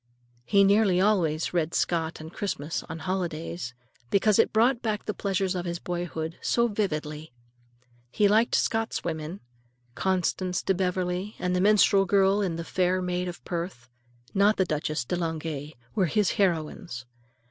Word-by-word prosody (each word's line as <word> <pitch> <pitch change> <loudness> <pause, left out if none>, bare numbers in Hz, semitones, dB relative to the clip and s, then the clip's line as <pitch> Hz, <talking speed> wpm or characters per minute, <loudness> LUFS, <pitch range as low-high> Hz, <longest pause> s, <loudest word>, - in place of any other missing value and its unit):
He 200 -1 +5
nearly 200 -2 +4
always 180 -7 +2
read 165 -2 0
Scott 165 -1 0
on 160 +1 -9
Christmas 165 -6 -3
and 160 0 -6
holidays, 170 -6 -3 0.3
because 205 - +3
it - - +4
brought 235 +3 +3
back 215 -3 -2
the 210 - -2
pleasures 195 -2 -1
of 180 -1 -3
his 170 0 -2
boyhood 170 -2 -4
so 235 0 +2
vividly. 155 - -3 0.8
He 205 +11 +3
liked 220 +3 +3
Scott's 225 0 0
women. 160 +2 -4 0.5
Constance 185 +1 0
de 195 - +2
Beverley 185 +2 -1
and 180 0 -1
the 180 - +2
minstrel 200 -1 +5
girl 195 +1 +3
in 180 -5 -1
"The 165 - -4
Fair 185 +1 +1
Maid 180 0 -2
of 175 0 -8
Perth," 170 -9 -5 0.4
not 205 +2 +4
the 190 - +3
Duchesse 155 -4 -2
de 180 - -1
Langeais, 160 -3 -4 0.2
were 190 -4 +2
his 210 +2 +2
heroines. 165 - -1
180 Hz, 155 wpm, -27 LUFS, 160-200 Hz, 0.8 s, He